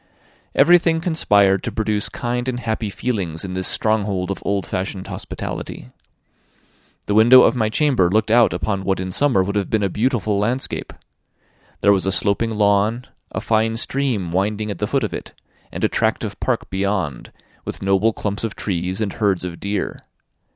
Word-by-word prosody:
Everything 165 +2 +5
conspired 105 - +2
to - - -4
produce 110 -2 0
kind 125 +1 -3
and 125 -1 -3
happy 110 -2 -2
feelings 95 -7 -3
in 90 - -5
this 95 0 0
stronghold 100 -4 +1
of 100 - -5
old 100 -1 -1
fashioned 95 0 -4
hospitality. - - -6 1.2
The 105 - -1
window 120 +4 +8
of - - +3
my 110 -3 +1
chamber 125 - +2
looked 110 +3 +1
out 120 0 +5
upon 90 +4 -2
what 95 -1 0
in 95 0 -4
summer 125 -3 +2
would 100 +2 -3
have 100 -2 -1
been 110 -2 +1
a 100 - +1
beautiful 110 -1 0
landscape. 120 +6 -2 0.9
There 100 - +5
was 95 -1 0
a - - +2
sloping 100 +4 +1
lawn, 105 +2 +1 0.3
a - - -3
fine 110 0 +1
stream 120 -9 -1
winding 105 +3 -1
at 100 - -7
the 105 - -1
foot 135 +2 0
of 105 - -3
it, - - -7 0.4
and - - -6
a - - +5
tract - - 0
of - - -5
park - - -2
beyond, 95 -9 -2 0.3
with - - -6
noble 95 +3 +3
clumps 105 0 -4
of 115 - -3
trees, 95 +1 -3
and 105 -3 -1
herds 100 -4 0
of 85 -2 -6
deer. 100 -1 -3
105 Hz, 180 wpm, -20 LUFS, 95-115 Hz, 1.2 s, window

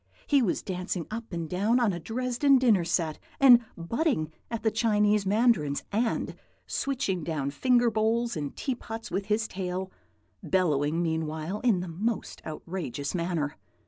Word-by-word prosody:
He 285 -2 +4
was 210 -8 0
dancing 180 -2 -3
up 225 0 -6
and 170 -2 -3
down 205 +9 +2
on 225 -5 +2
a 170 - -4
Dresden 250 - +2
dinner 230 -8 +4
set, 165 -2 -1 0.2
and 255 -3 +9 0.2
butting 170 - 0 0.2
at 230 -1 -4
the 220 - +3
Chinese 210 -2 +2
mandarins, 200 - +2
and 225 +3 0 0.3
switching 250 - -1
down 150 -3 -2
finger 245 - +3
bowls 225 +2 +1
and 145 -3 -4
teapots 225 -4 -5
with 195 +2 -1
his 215 +1 +1
tail, 185 0 -4 0.5
bellowing 160 -3 +1
meanwhile 160 +3 -2
in 225 -8 +2
the 180 - -5
most 200 +7 -3
outrageous 155 -4 -4
manner. 170 -4 -2
195 Hz, 145 wpm, -28 LUFS, 165-230 Hz, 0.5 s, and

